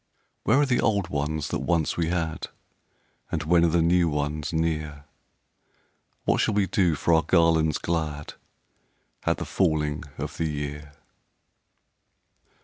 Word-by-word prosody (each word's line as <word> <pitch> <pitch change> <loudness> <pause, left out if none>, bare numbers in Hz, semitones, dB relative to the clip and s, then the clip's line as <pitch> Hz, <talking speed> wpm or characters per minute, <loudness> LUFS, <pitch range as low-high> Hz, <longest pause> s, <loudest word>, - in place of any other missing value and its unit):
Where 115 +6 +4
are 145 - +4
the 125 -3 +1
old 100 -5 +1
ones 75 0 -2
that - - -2
once 85 -3 0
we 85 -2 0
had, 80 -2 -2 0.8
And 80 - -1
when 85 +2 +4
are - - +5
the 85 0 +2
new 85 0 +3
ones 75 0 -2
near? 75 -3 -2 1.2
What - - +2
shall 110 - +1
we 100 -1 +3
do 90 -3 +2
for 85 +4 +1
our 80 - +5
garlands 80 -1 +3
glad 75 -3 -3 0.9
At - - +2
the - - -4
falling 75 -5 0 0.2
of 75 +1 -5
the 80 -1 -1
year?" 75 0 -5
80 Hz, 140 wpm, -26 LUFS, 75-85 Hz, 1.2 s, are